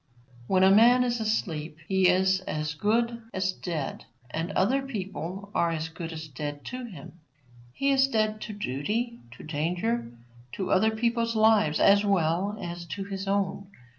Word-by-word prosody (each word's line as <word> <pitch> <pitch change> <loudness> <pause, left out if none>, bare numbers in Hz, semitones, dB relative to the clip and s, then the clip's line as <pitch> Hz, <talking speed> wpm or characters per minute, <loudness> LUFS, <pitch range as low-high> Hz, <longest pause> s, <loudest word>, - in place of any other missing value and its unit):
When 185 -1 +3
a 190 - +7
man 240 +5 +6
is 240 -1 0
asleep, 165 -8 -2
he 190 -1 +3
is 190 +1 +3
as 150 0 -2
good 235 +7 0
as 190 0 +1
dead, 165 -7 -5 0.3
and 165 +6 -3
other 250 +9 +2
people 200 -5 -6
are 170 - +2
as 165 -1 -3
good 165 0 -7
as 160 -1 -7
dead 145 +1 -6
to 250 0 -5
him. 175 -5 -11 0.5
He 275 - 0
is 270 0 +4
dead 215 -3 0
to 215 - -5
duty, 210 - -2
to 115 - -12
danger, 145 -7 -1 0.4
to 190 - -3
other 220 +4 +4
people's 230 +1 0
lives, 215 -8 +4
as 200 +1 +6
well 195 +1 +1
as 175 0 -6
to 195 +4 -4
his 195 0 -5
own. 195 0 -1
190 Hz, 165 wpm, -27 LUFS, 165-220 Hz, 0.5 s, a